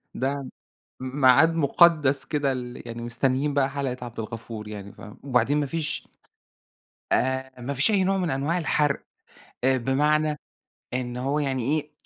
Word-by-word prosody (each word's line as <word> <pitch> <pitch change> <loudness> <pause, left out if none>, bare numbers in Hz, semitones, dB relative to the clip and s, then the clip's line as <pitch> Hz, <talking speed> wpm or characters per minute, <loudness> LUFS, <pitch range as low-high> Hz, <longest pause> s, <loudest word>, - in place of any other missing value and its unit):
ده 135 +1 -2 0.5
م 130 +2 -5
ميعاد 140 +6 +6
مُقدّس 150 -3 +4
كده 145 -3 0
ال 125 -1 -5
يعني 115 0 -6
مستنيين 130 +4 0
بقى 140 -1 +2
حلقة 135 -3 -3
عبد 120 -1 -8
الغفور 110 -1 -6
يعني 100 -1 -8
فاهمة؟ 105 - -12
وبعدين 140 +2 +2
ما 145 - 0
فيش 160 +2 -2 1.0
آآ، 130 0 0
ما 140 +4 -3
فيش 140 +10 +3
أي 195 -3 +3
نوع 195 +1 +1
من 180 -3 0
أنواع 145 +6 0
الحَرق. 150 -3 +1 0.6
أ 130 0 +4
بمعنى 150 +4 +1 0.6
إن 125 -1 -3
هو 135 +4 0
يعني 135 -4 -1
إيه، 150 +3 -1
135 Hz, 155 wpm, -25 LUFS, 125-150 Hz, 1.0 s, ميعاد